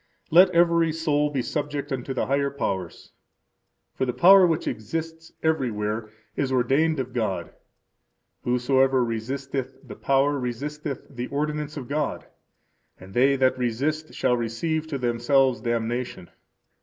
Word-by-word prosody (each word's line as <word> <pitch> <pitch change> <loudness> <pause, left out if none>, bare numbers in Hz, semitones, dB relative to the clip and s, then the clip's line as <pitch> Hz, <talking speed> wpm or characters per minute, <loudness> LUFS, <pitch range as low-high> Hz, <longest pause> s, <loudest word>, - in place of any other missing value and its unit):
Let 180 +4 +7
every 170 -2 +3
soul 150 -2 +1
be 135 -4 -2
subject 145 +1 -3
unto 135 0 -3
the - - 0
higher 140 +1 +1
powers. 95 -10 -4 0.8
For - - -2
the 125 -1 -1
power 185 +4 +7
which 160 -2 -1
exists 160 +8 -5
anywhere 110 -8 -1 0.3
is 135 -2 -1
ordained 135 +5 +2
of 130 -1 -4
God. 95 -8 -2 0.9
Whosoever 130 +1 +2
resisteth 130 +3 -4
the - - -8
power 140 +1 +1
resisteth 140 +3 -4
the 125 -2 -6
ordinance 150 +1 -3
of 130 -4 -6
God; 150 +1 -2 0.7
and 95 +1 -13
they 135 +3 +4
that 130 -1 +2
resist 145 +6 -2
shall 125 - +2
receive 155 +8 -2
to 150 -3 -3
themselves 125 0 +2
damnation. 120 -4 -3
135 Hz, 130 wpm, -25 LUFS, 120-150 Hz, 0.9 s, Let